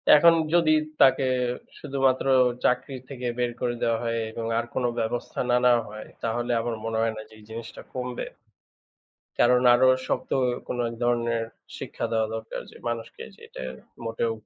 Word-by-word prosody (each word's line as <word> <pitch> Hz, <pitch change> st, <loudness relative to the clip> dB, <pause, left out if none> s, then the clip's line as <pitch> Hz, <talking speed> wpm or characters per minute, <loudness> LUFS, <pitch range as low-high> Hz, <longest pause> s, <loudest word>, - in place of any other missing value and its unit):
এখন 170 Hz, +3 st, +7 dB, 0.2 s
যদি 165 Hz, -3 st, +5 dB, 0.3 s
তাকে 135 Hz, 0 st, +6 dB, 0.5 s
শুধুমাত্র 135 Hz, -2 st, +1 dB, 0.4 s
চাকরির 125 Hz, +1 st, 0 dB
থেকে 125 Hz, -3 st, -4 dB
বের 120 Hz, -1 st, +1 dB
করে 120 Hz, -1 st, 0 dB
দেওয়া 115 Hz, -1 st, +2 dB
হয় 115 Hz, 0 st, -1 dB
এবং 115 Hz, 0 st, -5 dB
আর 120 Hz, -, -2 dB
কোনো 125 Hz, -, +1 dB
ব্যবস্থা 115 Hz, +2 st, -3 dB
না 120 Hz, -, +5 dB
নেওয়া 120 Hz, -1 st, +5 dB
হয়, 110 Hz, 0 st, -9 dB, 0.2 s
তাহলে 120 Hz, +1 st, -1 dB
আমার 115 Hz, 0 st, -2 dB
মনে 115 Hz, 0 st, -1 dB
হয় 115 Hz, 0 st, +1 dB
না -, -, -5 dB
যে, -, -, -17 dB
এই -, -, -16 dB
জিনিসটা 115 Hz, +1 st, -8 dB
কমবে। 125 Hz, -1 st, -4 dB, 1.1 s
কারণ 125 Hz, +1 st, +5 dB
আরও 130 Hz, +1 st, +5 dB, 0.2 s
শক্ত -, -, -2 dB, 0.4 s
কোনো 125 Hz, -, -2 dB
এক 115 Hz, -, -6 dB
ধরনের 120 Hz, -1 st, +1 dB, 0.4 s
শিক্ষা -, -, -5 dB
দেওয়া 110 Hz, -1 st, +2 dB
দরকার 110 Hz, 0 st, -5 dB
যে, -, -, -15 dB
মানুষকে 115 Hz, -1 st, -5 dB
যে -, -, -22 dB
এটা -, -, -8 dB, 0.4 s
মোটেও 115 Hz, 0 st, -1 dB
120 Hz, 165 wpm, -26 LUFS, 115-125 Hz, 1.1 s, এখন